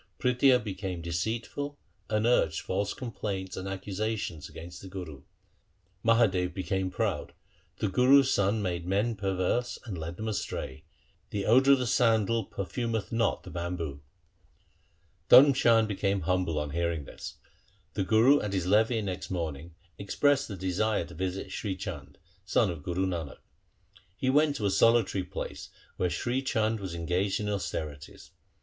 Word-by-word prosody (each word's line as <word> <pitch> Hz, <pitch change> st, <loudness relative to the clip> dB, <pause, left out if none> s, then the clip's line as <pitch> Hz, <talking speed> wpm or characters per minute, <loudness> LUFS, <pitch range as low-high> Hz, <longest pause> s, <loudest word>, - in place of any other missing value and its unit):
Prithia 125 Hz, 0 st, +4 dB
became 95 Hz, -6 st, -5 dB
deceitful 115 Hz, -, -3 dB, 0.3 s
and 110 Hz, 0 st, +1 dB
urged 100 Hz, -10 st, +2 dB
false 100 Hz, +2 st, -1 dB
complaints 100 Hz, -6 st, -4 dB
and 95 Hz, 0 st, -5 dB
accusations 95 Hz, -3 st, -3 dB
against 85 Hz, +2 st, -10 dB
the 95 Hz, -, -9 dB
Guru. 90 Hz, -7 st, -7 dB, 0.8 s
Mahadev 100 Hz, -6 st, +3 dB
became 95 Hz, 0 st, -1 dB
proud -, -, -2 dB, 0.2 s
— -, -, -37 dB
the -, -, 0 dB
Gurus' 130 Hz, +7 st, +5 dB
sons 100 Hz, +2 st, +1 dB
made 85 Hz, -2 st, -2 dB
men 105 Hz, +5 st, +1 dB
per 95 Hz, -1 st, -2 dB
verse 120 Hz, +7 st, 0 dB
and 110 Hz, -5 st, -5 dB
led 85 Hz, +1 st, -6 dB
them 110 Hz, -, -4 dB
astray. 75 Hz, -8 st, -4 dB, 0.4 s
The 100 Hz, -2 st, -3 dB
odour 130 Hz, +5 st, +6 dB
of -, -, +5 dB
the 125 Hz, -, 0 dB
sandal 115 Hz, -2 st, +2 dB
perfumeth 110 Hz, +3 st, -3 dB
not 115 Hz, -2 st, 0 dB
the -, -, -10 dB
bamboo. 85 Hz, -5 st, -4 dB, 1.3 s
1 140 Hz, +1 st, +9 dB
Dharm -, -, -10 dB
Chand 115 Hz, -3 st, +4 dB
became 100 Hz, -1 st, 0 dB
humble 90 Hz, -4 st, 0 dB
on 75 Hz, -1 st, -2 dB
hearing 85 Hz, -2 st, -1 dB
this. -, -, -9 dB, 0.6 s
The -, -, 0 dB
Guru 115 Hz, +9 st, +5 dB
at 105 Hz, -1 st, -3 dB
his 95 Hz, -3 st, 0 dB
levee 110 Hz, +3 st, +3 dB
next 95 Hz, -2 st, -4 dB
morning 80 Hz, -2 st, -4 dB, 0.2 s
expressed 140 Hz, +8 st, +1 dB
a 100 Hz, -, -4 dB
desire 95 Hz, +2 st, 0 dB
to 85 Hz, -, -12 dB
visit 95 Hz, +2 st, -4 dB
Sri 100 Hz, -3 st, -3 dB
Chand, 80 Hz, -8 st, -7 dB, 0.3 s
son 100 Hz, +1 st, +2 dB
of 80 Hz, -4 st, -7 dB
Guru 90 Hz, +5 st, -1 dB
Nanak. 85 Hz, -6 st, -4 dB, 0.8 s
He 130 Hz, +4 st, +1 dB
went 145 Hz, +1 st, +3 dB
to 110 Hz, -, -2 dB
a 100 Hz, -, +2 dB
solitary 105 Hz, -2 st, +3 dB
place 90 Hz, -, -6 dB, 0.3 s
where 90 Hz, -, +1 dB
Sri 120 Hz, +10 st, -1 dB
Chand 110 Hz, -4 st, 0 dB
was 95 Hz, -4 st, -5 dB
en 85 Hz, -1 st, -5 dB
gaged 95 Hz, +3 st, 0 dB
in 105 Hz, -, -2 dB
austerities. 80 Hz, -7 st, -5 dB
95 Hz, 160 wpm, -29 LUFS, 90-115 Hz, 1.3 s, 1